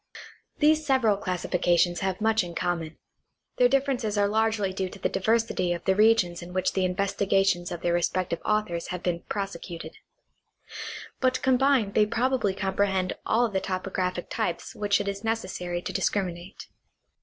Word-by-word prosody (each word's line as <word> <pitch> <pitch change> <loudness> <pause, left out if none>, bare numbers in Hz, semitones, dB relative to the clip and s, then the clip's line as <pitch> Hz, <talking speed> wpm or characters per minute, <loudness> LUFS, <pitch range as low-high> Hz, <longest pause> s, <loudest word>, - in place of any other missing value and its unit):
These 310 0 +4
several 260 -7 +3
classifications 175 -2 +1
have 190 -2 -2
much 220 -1 +3
in 170 -1 -8
common; 165 -3 -2 0.6
their 245 0 +5
differences 260 -5 0
are 205 0 +3
largely 215 -2 +1
due 190 -1 -2
to 200 - -11
the - - -1
diversity 220 -4 +1
of 170 - -7
the 190 - +4
regions 210 -5 +3
in 175 +1 -9
which 185 0 0
the 190 -1 +1
investigations 195 -1 +1
of 175 - -5
their 175 - +1
respective 175 0 0
authors 210 -6 -1
have 180 -1 -5
been 175 -2 0
prosecuted; 190 -4 -5 1.2
but 255 -1 +1
combined 260 -5 +3
they 210 -1 +4
probably 230 -3 0
comprehend 190 -1 0
all 240 +1 +3
the 195 -3 -2
topographic 185 -1 -2
types 170 - -3
which 205 -1 +1
it 205 - -3
is 200 +1 -4
necessary 185 -6 -3
to - - -4
discriminate. 185 -1 -2
195 Hz, 155 wpm, -27 LUFS, 180-220 Hz, 1.2 s, their